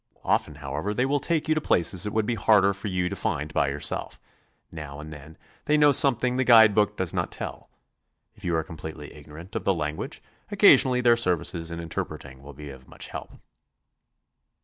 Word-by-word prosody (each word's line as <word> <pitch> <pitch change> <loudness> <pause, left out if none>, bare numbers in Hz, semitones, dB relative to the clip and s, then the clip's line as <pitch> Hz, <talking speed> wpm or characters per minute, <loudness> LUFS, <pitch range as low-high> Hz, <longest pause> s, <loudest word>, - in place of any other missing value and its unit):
Often, 75 - 0
however, 75 +9 -4
they 125 - +1
will 145 +2 0
take 160 +2 -2
you 155 - +3
to 155 - -1
places 95 - +1
it - - -3
would 110 0 0
be 120 - -1
harder 100 -2 +3
for 100 +2 -7
you 90 -2 -1
to 100 - -4
find 75 -4 -3
by - - +1
yourself; - - -3 0.5
now 75 -3 -8
and 75 +1 -9
then 75 +2 -13 0.3
they 150 - +2
know 145 -1 +5
something 125 -2 +3
the 130 - +2
guide 115 -4 +7
book 105 0 +1
does 95 -3 -2
not - - -2
tell; - - -8 0.6
if - - -20
you 85 -2 -1
are 80 - 0
completely 80 -2 -9
ignorant 80 +6 -12
of - - -3
the 95 - +1
language, 75 -1 -5 0.3
occasionally 125 -1 +5
their 120 -1 +5
services 85 -5 0
in 85 0 -6
interpreting 70 -5 -6
will 70 +1 -12
be 75 +1 -10
of 65 -1 -14
much - - -7
help. - - -8
90 Hz, 195 wpm, -25 LUFS, 75-115 Hz, 0.6 s, guide